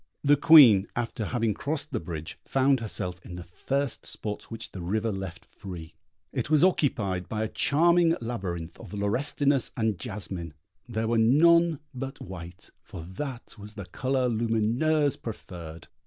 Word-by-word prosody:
The 145 0 +6
Queen, 130 -10 +8
after 115 -2 -3
having 115 -1 0
crossed 150 +5 -3
the 120 - -1
bridge, 80 -2 -7
found 135 0 +2
herself 90 -5 -4
in 90 - -9
the 90 - -7
first 135 +10 -3
spot 105 -1 -6
which 115 - -7
the 95 - -7
river 110 +6 -1
left 95 -3 -6
free; 85 -4 -9 0.4
it - - -2
was 155 +1 +4
occupied 100 - +1
by 110 0 -2
a - - -1
charming 170 +7 +3
labyrinth 95 -8 -5
of - - -9
laurestinus 135 +6 +1
and 110 -5 0
jasmine; 95 - -6 0.3
there 110 -1 -1
were 115 0 +2
none 165 +6 +5
but 135 +1 -6
white, 90 -1 -10
for 85 - -9
that 120 - -7
was 105 +1 -10
the 100 -4 -7
colour 130 +4 -1
Lumineuse 120 +6 +1
preferred. 85 -7 -8
115 Hz, 155 wpm, -27 LUFS, 95-140 Hz, 0.4 s, Queen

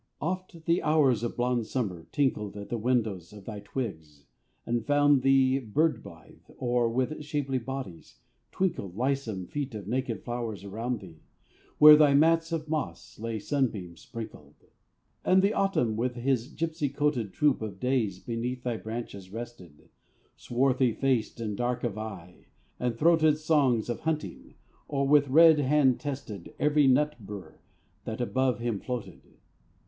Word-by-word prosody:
Oft 175 0 -4
the 170 +1 +2
hours 145 -7 +3
of 120 - -4
blonde 120 -2 0
Summer 95 -11 -3
tinkled 105 -8 0
At 100 - -8
the 120 - -2
windows 110 -7 -1
of 100 -2 -12
thy 105 -2 -6
twigs, 80 - -6 0.4
and 120 -1 -1
found 145 0 +4
thee 135 0 +4
Bird 150 +7 0
blithe; - - -14 0.2
or, 120 -1 +1
with 130 +6 -2
shapely 145 -3 -2
bodies, 125 -8 -7 0.3
twinkled 170 - -2
Lissom 125 -7 -1
feet 140 -1 -4
of 100 -3 -7
naked 125 -3 -2
flowers 120 -4 -4
around 115 +4 -3
thee, 85 -5 -13 0.6
Where 150 0 +10
thy 150 -2 +5
mats 165 +2 +3
of 160 -2 -2
moss 155 -7 -4
lay 115 0 -3
sunbeam 105 -8 -2
sprinkled. 115 +6 -10 0.7
And 190 +1 +4
the 200 +2 +3
Autumn 160 - +1
with 120 +2 -1
his 125 -1 0
gipsy 160 -1 -2
coated 140 -7 -1
Troop 145 0 +2
of 100 -4 -6
days 125 -7 0
beneath 120 +4 -4
thy 120 -2 -2
branches 110 -4 -7
rested, 110 -9 -9 0.5
Swarthy 125 -1 +1
faced 125 -3 0
and 110 -3 -3
dark 120 +2 -2
of 115 -5 -1
eye; 95 -5 -9 0.3
and 120 -2 -1
throated 155 0 +4
Songs 145 -7 +2
of 120 - -3
hunting; 160 -1 -4 0.3
or 140 -1 0
with 145 0 +5
red 160 +3 +7
hand 140 -2 +3
tested 135 - -6
Every 150 -1 +3
nut 150 +3 +3
bur 100 -2 -10 0.5
that 110 - -5
above 130 +1 +1
him 120 -3 -2
floated. 125 0 -6
125 Hz, 150 wpm, -28 LUFS, 110-145 Hz, 0.7 s, Where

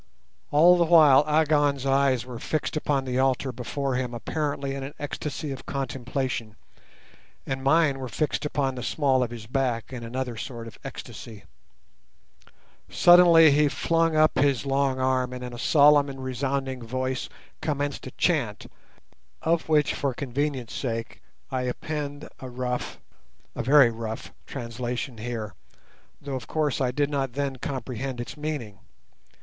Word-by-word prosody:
All 175 +4 +6
the 170 - +4
while 155 -5 +7
Agon's 145 -3 +2
eyes 135 -3 +2
were 125 -2 -8
fixed 155 +5 -2
upon 145 -3 0
the 130 0 -1
altar 130 0 +1
before 130 +3 -3
him 125 -1 -2
apparently 140 +2 -2
in 135 - -5
an 135 +2 -7
ecstasy 145 0 -4
of 135 - -8
contemplation, 130 -4 -3 0.9
and 135 0 -3
mine 145 -1 +3
were 130 - -4
fixed 155 +7 -1
upon 140 -3 -1
the 125 - -6
small 135 +1 +1
of 125 - 0
his 115 -2 -8
back 125 -1 -2
in 120 -2 -6
another 125 +1 -4
sort 115 0 -6
of 115 - -11
ecstasy. 110 -4 -9 1.5
Suddenly 170 -3 +7
he 150 +1 +4
flung 165 +2 +1
up 155 -3 +4
his 140 -1 +2
long 135 -1 +1
arm, 130 -1 +1
and 125 0 -6
in 125 -1 -6
a 120 - -8
solemn 145 +1 +5
and 135 -1 -7
resounding 130 0 -2
voice 130 +2 -3 0.3
commenced 145 -2 -2
a - - -7
chant, - - 0 0.8
of 165 0 +1
which 150 -2 +3
for 135 -3 -2
convenience' 135 -2 -3
sake 115 -3 -4 0.3
I 130 -1 -1
append 145 +3 -4
a 130 - -7
rough, 125 0 -3 0.6
a - - -3
very 135 0 +6
rough, 110 -1 -6
translation 120 -1 -5
here, 110 -3 -4 0.7
though, 140 -1 -6
of 130 - -6
course, 150 -3 0
I 130 - +2
did 145 +3 0
not 135 -3 -1
then 140 -1 -2
comprehend 130 -1 -4
its 120 - -6
meaning. 145 -10 -5
135 Hz, 150 wpm, -26 LUFS, 125-145 Hz, 1.5 s, while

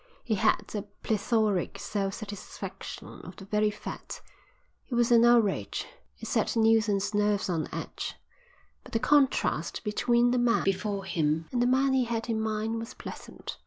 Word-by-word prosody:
He 230 - -1
had 205 - +2
the 210 -1 -5 0.2
plethoric 215 -3 +1
self 195 -2 -2
satisfaction 200 -2 -8
of 180 +1 -10
the 195 - -11
very 210 +1 +2
fat. 210 - -7 0.7
It 245 - -2
was 240 0 +3
an 235 -1 +7
outrage. 235 -4 +3 0.3
It - - -8
set - - 0
Neilson's 215 -3 +3
nerves 205 -2 +1
on 160 -3 -1
edge. - - -5 0.7
But - - -15
the 225 - +2
contrast 275 +2 +2
between 240 +3 +2
the 250 - +2
man 240 -1 +3
before 195 0 -1
him 160 -3 0
and 245 - 0
the 245 - +3
man 265 +1 +3
he 260 -2 +3
had 230 0 -3
in 220 -1 0
mind 220 +1 -1
was 230 +1 -7
pleasant. - - -8
220 Hz, 165 wpm, -28 LUFS, 200-235 Hz, 0.7 s, an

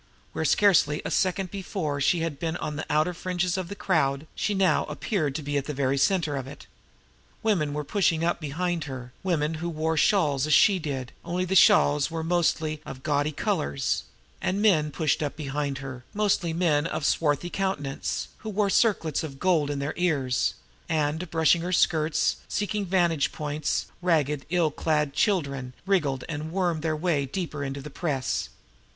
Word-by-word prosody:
Where - - -2
scarcely 165 -7 +4
a - - -3
second 185 -1 0
before 175 -7 -3
she 165 +4 +3
had 160 -4 -3
been 165 0 -2
on 150 - -4
the 160 - -5
outer 155 +4 +2
fringe 180 0 -1
of 185 -2 -3
the 200 - -6
crowd, 150 -7 +1
she 205 - -1
now 190 -4 +3
appeared 150 - -2
to 155 - -3
be 145 0 -1
in 140 - 0
the 150 - -4
very 135 0 +1
center 160 -1 +2
of 135 -1 -5
it. 140 - -11 0.8
Women 180 -10 +1
were 150 +1 -3
pushing 165 0 +1
up 170 - 0
behind 165 +2 -2
her, 125 -3 -7
women 165 -4 0
who 170 - -2
wore 160 0 -1
shawls 150 -7 +3
as 155 - +5
she 200 -3 +5
did, 135 -6 -4
only 180 +2 -1
the 185 - -2
shawls 145 -5 +5
were 165 -1 -3
mostly 160 -2 0
of 130 -3 -9
gaudy 145 0 +1
colors; 70 - -1 0.4
and 185 +2 0
men 175 -8 +3
pushed 155 +1 0
up 145 -1 -2
behind 145 -2 -3
her, 130 -2 -7
mostly 200 -5 +1
men 160 -3 +1
of 155 - -3
swarthy 150 +2 +1
countenance, 150 -9 -2
who 220 - -6
wore 205 -1 +1
circlets 200 - +2
of 140 -4 -6
gold 165 -4 +2
in 145 - -2
their 140 +2 -2
ears; 145 -8 +1 0.3
and, 160 +2 0
brushing 165 +1 +3
her 175 +2 -3
skirts, 160 -3 +2
seeking 205 -1 -2
vantage 170 -5 +2
points, 150 0 -2 0.2
ragged, 150 -5 +1
ill 170 -3 +2
clad 150 -2 0
children 140 - 0
wriggled 150 -10 +1
and 155 0 -5
wormed 175 -3 0
their 155 0 0
way 155 -4 0
deeper 150 -1 -4
into 140 0 -4
the 150 - -8
press. 135 -7 -2
155 Hz, 180 wpm, -26 LUFS, 145-180 Hz, 0.8 s, as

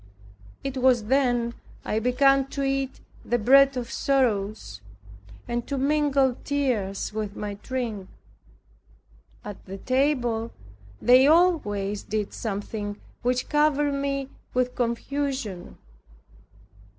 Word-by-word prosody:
It 275 -1 -4
was 250 -3 +4
then 245 -1 +1 0.3
I 215 - 0
began 270 +3 +3
to 275 0 -4
eat 270 -1 -2 0.2
the 240 - 0
bread 270 +4 +5
of 240 -2 -4
sorrows, 210 - 0 0.7
and 240 0 -3
to 280 - -2
mingle 275 -2 +2
tears 235 -9 -1
with 210 -1 -4
my 205 -1 -4
drink. 230 -7 -4 1.4
At 205 -2 -8
the 195 +1 -6
table 245 -2 0 0.5
they 255 +2 +6
always 210 - +2
did 215 -1 -3
something 205 -1 -4 0.2
which 250 +1 0
covered 295 -1 +2
me 275 -1 -2 0.3
with 250 0 +1
confusion. 245 -4 -3
250 Hz, 105 wpm, -25 LUFS, 215-275 Hz, 1.4 s, they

